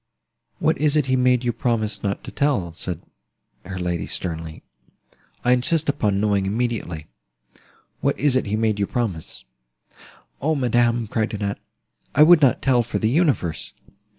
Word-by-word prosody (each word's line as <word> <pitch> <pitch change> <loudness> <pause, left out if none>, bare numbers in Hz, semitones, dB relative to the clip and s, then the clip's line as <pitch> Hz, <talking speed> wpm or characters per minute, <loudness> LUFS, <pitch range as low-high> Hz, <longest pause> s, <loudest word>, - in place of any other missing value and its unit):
"What - - +1
is 150 0 +3
it 150 - +2
he 130 -1 +1
made 125 -1 +3
you 120 -1 0
promise 110 -4 -1
not 100 -1 -2
to - - -8
tell?" 115 - 0
said 85 0 -5 0.6
her 95 0 -5
lady, 90 -2 -2
sternly. 80 -3 -4 0.8
"I 125 - +4
insist 150 +5 +2
upon 105 -9 +1
knowing 100 -2 +1
immediately—what 85 - -5
is 145 -1 +3
it 130 - +1
he 105 - 0
made 110 -1 0
you 100 - 0
promise?" 105 -10 -3 1.0
"O 155 +3 +1
madam," 120 -3 +2
cried 110 0 -2
Annette, 100 -1 -3 0.6
"I 150 - +7
would 165 0 +7
not 135 -3 +3
tell 130 -3 +4
for 120 - -3
the 110 0 0
universe!" 135 - 0
115 Hz, 150 wpm, -22 LUFS, 95-130 Hz, 1.0 s, I